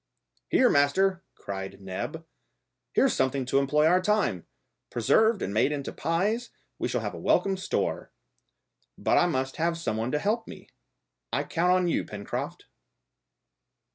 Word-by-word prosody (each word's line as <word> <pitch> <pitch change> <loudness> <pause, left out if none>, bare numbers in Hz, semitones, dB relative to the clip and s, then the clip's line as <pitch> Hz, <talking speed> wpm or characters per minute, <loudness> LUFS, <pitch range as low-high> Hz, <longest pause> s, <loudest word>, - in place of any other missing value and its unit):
"Here, 255 - +5
master," 185 +4 +3
cried 95 -1 -6
Neb; 95 -1 -5 0.7
"here's - - +3
something 130 0 0
to 135 +2 +2
employ 150 +2 +2
our 180 +3 +4
time! 205 - 0 0.4
Preserved 215 - +3
and 100 - -3
made 110 +7 +3
into 140 -2 -4
pies 205 +9 -1 0.3
we - - 0
shall - - -1
have - - -4
a - - -7
welcome 195 -1 +2
store! 190 - -2 0.9
But - - +3
I 175 - +4
must 130 -5 -2
have 165 +1 0
some 160 -10 -2
one 115 +3 -2
to 150 - +1
help 220 +8 -1
me. - - -11 0.6
I - - 0
count 175 +2 +1
on 180 -1 +3
you, 170 - +1
Pencroft." 100 -1 -5
155 Hz, 150 wpm, -27 LUFS, 130-190 Hz, 0.9 s, Here